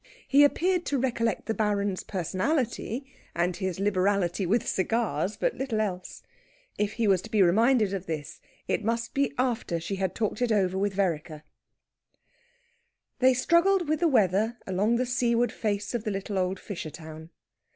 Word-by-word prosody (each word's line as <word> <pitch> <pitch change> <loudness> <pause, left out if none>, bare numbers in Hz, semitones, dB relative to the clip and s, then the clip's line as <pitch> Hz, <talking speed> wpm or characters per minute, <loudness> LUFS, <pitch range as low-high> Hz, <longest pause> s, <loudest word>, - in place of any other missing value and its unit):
He 280 +1 +6
appeared 355 +5 +2
to 280 - 0
recollect 235 -3 -1
the 225 - -1
Baron's 205 -3 0
personality, 235 - -2 0.3
and 175 +1 0
his 190 -1 -3
liberality 195 -2 +1
with 225 +5 +1
cigars, 205 -2 -1
but - - 0
little 255 -5 -2
else. 185 -4 -4 0.5
If 205 0 -1
he 230 -1 0
was 190 -3 +3
to 225 - -10
be 215 -3 +4
reminded 215 +3 +3
of 190 -1 -4
this, 155 -3 -5 0.3
it - - 0
must 230 +2 -1
be 280 0 +1
after 240 -9 -1
she 195 +4 -4
had 190 -1 -2
talked 215 0 -2
over 205 -6 +2
it - - -1
with 200 -1 -1
Vereker. 160 -5 -2 1.8
They 255 0 +5
struggled 340 +6 +3
with 310 0 +1
the 345 - +3
weather 220 - +2
along 200 +5 +1
the 250 +2 +1
seaward 245 -1 +1
face 205 -1 -2
of 235 -3 -2
the 220 - -2
little 195 0 -3
old 185 0 -1
fisher 175 -6 -6
town. 160 0 -10
210 Hz, 165 wpm, -27 LUFS, 185-240 Hz, 1.8 s, He